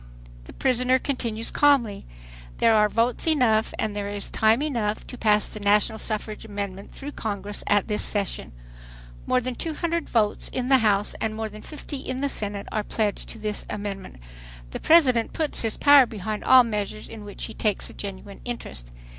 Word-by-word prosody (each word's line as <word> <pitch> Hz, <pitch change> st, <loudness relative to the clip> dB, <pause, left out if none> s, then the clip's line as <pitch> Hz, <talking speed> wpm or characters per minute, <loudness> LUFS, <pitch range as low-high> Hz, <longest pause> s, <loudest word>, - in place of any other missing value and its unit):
The -, -, -12 dB
prisoner 255 Hz, 0 st, +2 dB
continues 235 Hz, -4 st, -2 dB
calmly: 265 Hz, -8 st, +2 dB, 0.5 s
"There 230 Hz, -, +4 dB
are 210 Hz, -1 st, +4 dB
votes 230 Hz, +7 st, 0 dB
enough 240 Hz, -8 st, +3 dB
and 215 Hz, -2 st, -2 dB
there 205 Hz, -1 st, -3 dB
is 205 Hz, -1 st, -4 dB
time 220 Hz, +5 st, +3 dB
enough 230 Hz, -8 st, -2 dB
to -, -, -9 dB
pass 210 Hz, -3 st, +3 dB
the 215 Hz, -, -8 dB
national 210 Hz, +2 st, +2 dB
suffrage 215 Hz, -1 st, -3 dB
amendment 200 Hz, -2 st, -6 dB
through 285 Hz, +1 st, -8 dB
Congress 205 Hz, -4 st, -5 dB
at 205 Hz, -1 st, +3 dB
this 210 Hz, -2 st, 0 dB
session. 200 Hz, -, 0 dB, 0.8 s
More 255 Hz, -, +3 dB
than 250 Hz, +1 st, -3 dB
200 330 Hz, +3 st, -2 dB
votes 215 Hz, -3 st, +1 dB
in 255 Hz, 0 st, -3 dB
the 265 Hz, -1 st, +6 dB
House 210 Hz, -2 st, +2 dB
and 220 Hz, -1 st, -1 dB
more 220 Hz, 0 st, -3 dB
than 215 Hz, 0 st, -11 dB
50 300 Hz, 0 st, -7 dB
in 260 Hz, -1 st, -5 dB
the 280 Hz, -, 0 dB
Senate 205 Hz, -4 st, -4 dB
are 215 Hz, -, 0 dB
pledged 210 Hz, -1 st, -2 dB
to -, -, -8 dB
this 210 Hz, -1 st, -3 dB
amendment. 200 Hz, -2 st, -5 dB, 0.6 s
The -, -, -5 dB
President 260 Hz, -9 st, +4 dB
puts 315 Hz, -2 st, -1 dB
his 225 Hz, -2 st, 0 dB
power 285 Hz, -3 st, +7 dB
behind 215 Hz, 0 st, -5 dB
all 260 Hz, -1 st, +8 dB
measures 215 Hz, -2 st, -4 dB
in 220 Hz, -2 st, -9 dB
which 205 Hz, -1 st, -8 dB
he -, -, -7 dB
takes 210 Hz, -3 st, 0 dB
a -, -, -12 dB
genuine 200 Hz, 0 st, -8 dB
interest. 230 Hz, -, -6 dB
220 Hz, 180 wpm, -25 LUFS, 205-255 Hz, 0.8 s, all